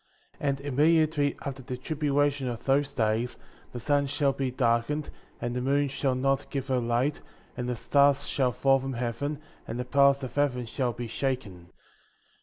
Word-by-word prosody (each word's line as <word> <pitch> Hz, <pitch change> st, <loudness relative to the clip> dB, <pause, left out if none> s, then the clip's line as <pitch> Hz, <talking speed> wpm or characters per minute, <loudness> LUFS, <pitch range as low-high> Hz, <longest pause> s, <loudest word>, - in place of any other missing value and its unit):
33. 140 Hz, -, 0 dB
And 140 Hz, 0 st, -2 dB
immediately 150 Hz, +1 st, +2 dB
after 135 Hz, -2 st, -4 dB
the 125 Hz, 0 st, -5 dB
tribulation 145 Hz, -1 st, 0 dB
of 120 Hz, -1 st, -5 dB
those 140 Hz, +1 st, +2 dB
days, 115 Hz, 0 st, 0 dB, 0.3 s
the 120 Hz, -, -6 dB
sun 140 Hz, +3 st, +1 dB
shall 140 Hz, 0 st, +1 dB
be 135 Hz, -1 st, -1 dB
darkened, 125 Hz, +4 st, 0 dB, 0.3 s
and 120 Hz, 0 st, -3 dB
the 125 Hz, -, -1 dB
moon 140 Hz, +2 st, +2 dB
shall 135 Hz, -1 st, 0 dB
not 135 Hz, +1 st, 0 dB
give 135 Hz, -1 st, -4 dB
her 130 Hz, -1 st, +2 dB
light, 120 Hz, +4 st, 0 dB, 0.3 s
and 125 Hz, -1 st, -3 dB
the 125 Hz, -, -1 dB
stars 140 Hz, +4 st, +3 dB
shall 130 Hz, -4 st, +1 dB
fall 135 Hz, +2 st, +3 dB
from 135 Hz, 0 st, -4 dB
heaven, 125 Hz, +5 st, -3 dB, 0.3 s
and 115 Hz, -, -4 dB
the 125 Hz, -, -2 dB
powers 140 Hz, +1 st, +4 dB
of 125 Hz, -2 st, -5 dB
heaven 135 Hz, -4 st, 0 dB
shall 125 Hz, +2 st, -1 dB
be 120 Hz, 0 st, -6 dB
shaken. 110 Hz, -8 st, -3 dB
135 Hz, 180 wpm, -28 LUFS, 125-145 Hz, 0.3 s, powers